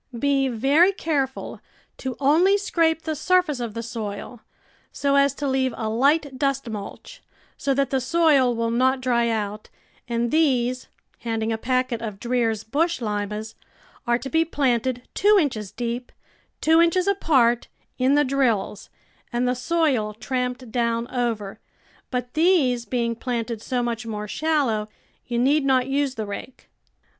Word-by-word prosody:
Be 275 Hz, +1 st, +2 dB
very 275 Hz, -, +4 dB
careful 285 Hz, -8 st, -3 dB, 0.4 s
to 260 Hz, -2 st, -4 dB
only 330 Hz, +8 st, +4 dB
scrape 330 Hz, -5 st, +1 dB
the 315 Hz, -1 st, -2 dB
surface 350 Hz, -3 st, +1 dB
of 235 Hz, -3 st, -5 dB
the 230 Hz, -, -4 dB
soil, 220 Hz, +1 st, -6 dB, 0.5 s
so 280 Hz, 0 st, 0 dB
as 280 Hz, 0 st, +3 dB
to 285 Hz, -, -3 dB
leave 260 Hz, -2 st, 0 dB
a 220 Hz, -, -2 dB
light 275 Hz, +3 st, +1 dB
dust 275 Hz, -2 st, 0 dB
mulch, 220 Hz, -, -8 dB, 0.3 s
so 275 Hz, -1 st, -1 dB
that 275 Hz, -1 st, 0 dB
the 265 Hz, -1 st, +1 dB
soil 275 Hz, -4 st, +3 dB
will 230 Hz, 0 st, -1 dB
not 260 Hz, +3 st, +2 dB
dry 240 Hz, -2 st, +1 dB
out; 215 Hz, -1 st, -3 dB, 0.4 s
and 235 Hz, 0 st, -1 dB
these," 255 Hz, -5 st, +1 dB, 0.3 s
handing 225 Hz, -1 st, -2 dB
a -, -, -2 dB
packet 255 Hz, -1 st, 0 dB
of 210 Hz, -4 st, -6 dB
Dreer's 230 Hz, -3 st, 0 dB
Bush 325 Hz, +9 st, 0 dB
Limas, 210 Hz, -1 st, -3 dB, 0.3 s
" -, -, -29 dB
are 240 Hz, 0 st, +3 dB
to 250 Hz, +3 st, -7 dB
be 320 Hz, +4 st, +2 dB
planted 255 Hz, -5 st, -1 dB
two 415 Hz, +1 st, +4 dB
inches 220 Hz, -, -2 dB
deep, 240 Hz, +1 st, -4 dB, 0.5 s
two 320 Hz, +1 st, +5 dB
inches 340 Hz, +2 st, +3 dB
apart, 270 Hz, -12 st, +2 dB, 0.3 s
in 260 Hz, +3 st, +3 dB
the 295 Hz, -, +4 dB
drills, 240 Hz, -7 st, 0 dB, 0.4 s
and 240 Hz, +1 st, 0 dB
the 250 Hz, -, +2 dB
soil 255 Hz, -6 st, 0 dB
tramped 250 Hz, 0 st, -3 dB
down 235 Hz, -1 st, 0 dB
over, 230 Hz, -6 st, -2 dB, 0.5 s
but 250 Hz, -1 st, -3 dB
these 305 Hz, -8 st, +3 dB
being 235 Hz, 0 st, -1 dB
planted 230 Hz, -2 st, -3 dB
so 250 Hz, 0 st, -1 dB
much 235 Hz, -1 st, -3 dB
more 210 Hz, -1 st, -4 dB
shallow, 250 Hz, -6 st, 0 dB, 0.4 s
you 240 Hz, -, -2 dB
need 280 Hz, +5 st, +3 dB
not 260 Hz, -2 st, +3 dB
use 275 Hz, 0 st, -1 dB
the 220 Hz, -, -3 dB
rake. 205 Hz, +5 st, -8 dB
250 Hz, 155 wpm, -23 LUFS, 230-285 Hz, 0.5 s, two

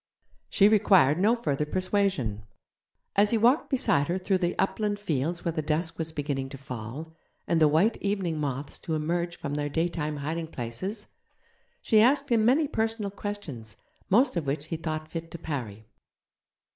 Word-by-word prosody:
She 200 Hz, -, +5 dB
required 190 Hz, -8 st, +5 dB
no 215 Hz, +5 st, +4 dB
further 150 Hz, -, -1 dB
persuasion. 185 Hz, -, 0 dB, 0.7 s
As 205 Hz, +1 st, +4 dB
he 230 Hz, -, +2 dB
walked 240 Hz, +7 st, +3 dB
beside 145 Hz, -, +2 dB
her 175 Hz, -, 0 dB
through 190 Hz, 0 st, 0 dB
the 175 Hz, -1 st, -1 dB
upland 205 Hz, +2 st, 0 dB
fields 170 Hz, -3 st, -2 dB
where 170 Hz, -, +1 dB
the 160 Hz, -1 st, -2 dB
dusk 160 Hz, +3 st, -1 dB
was 160 Hz, 0 st, -2 dB
beginning 140 Hz, -3 st, -3 dB
to 135 Hz, -, -8 dB
fall, 130 Hz, +5 st, -7 dB, 0.3 s
and 165 Hz, -1 st, +2 dB
the 155 Hz, -, +7 dB
white 165 Hz, +10 st, +3 dB
evening 190 Hz, -6 st, -1 dB
moths 140 Hz, -1 st, -4 dB
to 160 Hz, -, -3 dB
emerge 170 Hz, +3 st, -1 dB
from 140 Hz, -, -5 dB
their 145 Hz, 0 st, -1 dB
daytime 155 Hz, -1 st, -1 dB
hiding 160 Hz, +3 st, -3 dB
places, 165 Hz, -, -5 dB, 0.8 s
she 215 Hz, -1 st, +5 dB
asked 275 Hz, +4 st, +3 dB
him 230 Hz, -3 st, +3 dB
many 275 Hz, +7 st, +4 dB
personal 220 Hz, -5 st, -1 dB
questions, 185 Hz, -, -7 dB, 0.3 s
most 240 Hz, +6 st, +4 dB
of 165 Hz, -5 st, -2 dB
which 145 Hz, +2 st, -2 dB
he 165 Hz, -, -4 dB
thought 155 Hz, -1 st, -4 dB
fit 165 Hz, 0 st, -6 dB
to 170 Hz, -, -7 dB
parry. 120 Hz, -10 st, -5 dB
165 Hz, 170 wpm, -27 LUFS, 145-205 Hz, 0.8 s, the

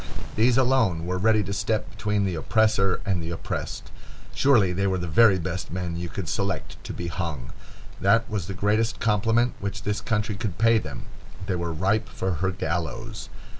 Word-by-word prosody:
These 120 Hz, +3 st, +4 dB
alone 120 Hz, -11 st, +2 dB
were 90 Hz, +1 st, -2 dB
ready 110 Hz, +1 st, +3 dB
to 100 Hz, +1 st, -4 dB
step 100 Hz, +2 st, -1 dB
between 105 Hz, -1 st, 0 dB
the 95 Hz, -, -1 dB
oppressor 100 Hz, +2 st, +2 dB
and 95 Hz, -5 st, 0 dB
the 80 Hz, -, -5 dB
oppressed. 85 Hz, -, -5 dB, 0.4 s
Surely 110 Hz, -10 st, +4 dB
they 100 Hz, +2 st, 0 dB
were 95 Hz, -1 st, +1 dB
the 90 Hz, -, -3 dB
very 95 Hz, +4 st, +5 dB
best 90 Hz, +1 st, -4 dB
men 90 Hz, -1 st, -3 dB
you 85 Hz, 0 st, -4 dB
could -, -, -5 dB
select -, -, -3 dB
to -, -, -5 dB
be 85 Hz, -, -5 dB
hung. 85 Hz, -8 st, -4 dB, 0.5 s
That 115 Hz, +4 st, +3 dB
was 100 Hz, -6 st, -3 dB
the 100 Hz, -, -5 dB
greatest 110 Hz, +3 st, +1 dB
compliment 115 Hz, +3 st, +2 dB
which 100 Hz, 0 st, -4 dB
this 105 Hz, +1 st, -1 dB
country 105 Hz, -1 st, -1 dB
could 100 Hz, -2 st, -4 dB
pay 115 Hz, +1 st, +4 dB
them. 70 Hz, -, -7 dB, 0.4 s
They 95 Hz, -, -1 dB
were 85 Hz, -1 st, -2 dB
ripe 100 Hz, +7 st, 0 dB
for 95 Hz, -, -2 dB
her 95 Hz, -, +2 dB
gallows. 85 Hz, -5 st, -4 dB
100 Hz, 185 wpm, -25 LUFS, 90-110 Hz, 0.5 s, very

